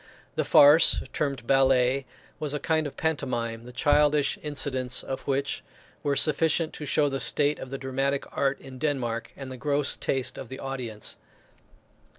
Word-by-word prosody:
The - - 0
farce, 145 +3 +6
termed 140 -5 -2
ballet, 135 0 +3 0.3
was 150 -1 -1
a - - -2
kind 155 +1 0
of 145 - -10
pantomime, 120 -7 -2
the - - -9
childish 145 +2 +2
incidents 130 -4 0
of 135 - -4
which 140 0 -1 0.4
were 140 -1 0
sufficient 160 +2 +2
to 150 - -7
show 145 +2 +2
the 135 -1 -2
state 145 +1 +1
of 130 - -7
the 135 - -4
dramatic 135 +1 -1
art 135 -1 0
in 130 -1 -11
Denmark, 125 -6 -2
and 135 -2 -7
the 130 - -7
gross 145 +1 0
taste 135 -2 -2
of 120 - -8
the 130 - -7
audience. 125 -6 -5
135 Hz, 165 wpm, -27 LUFS, 130-145 Hz, 0.4 s, farce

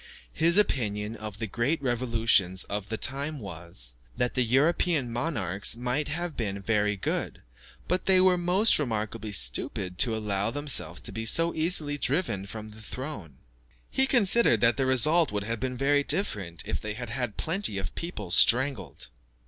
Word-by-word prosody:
His 170 +3 +3
opinion 110 - 0
of 105 -2 -7
the 115 - -4
great 120 +9 -1
revolutions 115 -7 +1
of 105 0 -5
the 110 - -3
time 140 +6 +1
was, 85 - -3 0.2
that 125 - 0
the 130 - 0
European 135 +1 +1
monarchs 105 - -2
might 125 +5 -2
have 165 +1 -4
been 100 -4 -3
very 105 0 0
good, - - -3 0.4
but 180 +2 -1
they 190 -1 +5
were 185 0 +4
most 180 +4 +3
remarkably 110 -4 -3
stupid 90 +7 0
to 115 -3 +2
allow 105 -1 -2
themselves 130 - -2
to - - -9
be 110 0 -5
so 165 +8 +2
easily 155 -3 +3
driven 125 - -1
from 110 +2 -8
the 110 +1 -13
throne. 110 - -8 0.5
He 265 0 +3
considered 235 - +4
that 115 -1 +5
the 135 -1 -1
result 155 +6 +4
would 105 -1 -3
have 115 +1 -3
been 125 +1 -4
very 145 +2 +2
different 100 - -1
if - - -3
they 105 -1 -4
had 120 -1 -7
had 120 -4 -4
plenty 165 - 0
of 95 -2 -4
people 105 - -6
strangled. 130 +4 +2
120 Hz, 165 wpm, -27 LUFS, 105-150 Hz, 0.5 s, they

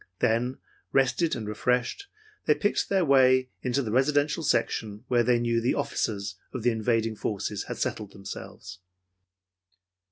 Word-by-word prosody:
Then, 120 +3 +1 0.3
rested 135 +5 +2
and 110 -4 -5
refreshed, 125 - -1 0.4
they 150 - +5
picked 205 +8 0
their 190 -3 +2
way 130 -2 +5
into 130 +2 0
the 110 - -3
residential 145 +6 +2
section 110 -7 -1
where 120 -1 +4
they 120 +1 +3
knew 120 -1 +1
the 120 - +1
officers 100 -3 -2 0.2
of 125 - -3
the 120 - +4
invading 115 0 0
forces 105 -1 -3
had - - -5
settled 105 -2 -3
themselves. 95 0 -9
120 Hz, 140 wpm, -27 LUFS, 110-130 Hz, 0.4 s, they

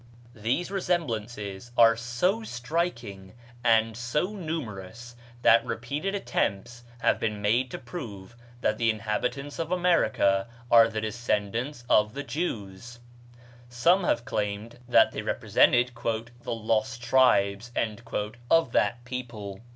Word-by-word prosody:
These 120 - -2
resemblances 120 - -2
are 115 -1 +7
so 120 - 0
striking 120 - -3 0.3
and 115 -1 +3
so 120 - -1
numerous 120 - -6 0.3
that 115 0 +6
repeated 140 - -3
attempts 120 - -2 0.2
have - - +2
been 105 -2 -2
made 115 +5 +1
to - - -5
prove 120 - -8 0.3
that 110 -1 0
the 115 -1 +3
inhabitants 115 +6 -2
of 165 +1 -3
America 115 - +2 0.2
are 115 -1 +8
the 110 -1 -3
descendants 115 +4 -2
of 105 +2 +3
the 145 - -4
Jews; 120 - -5 0.7
some 170 +11 +3
have 120 -8 0
claimed 105 +3 -3
that - - +6
they - - -4
represented 120 +1 +3
"the 115 +1 -4
lost 115 +2 -1
tribes" 115 -3 +3 0.8
of 165 -7 +4
that 120 0 +1
people. 115 -6 -6
120 Hz, 120 wpm, -27 LUFS, 110-130 Hz, 0.8 s, are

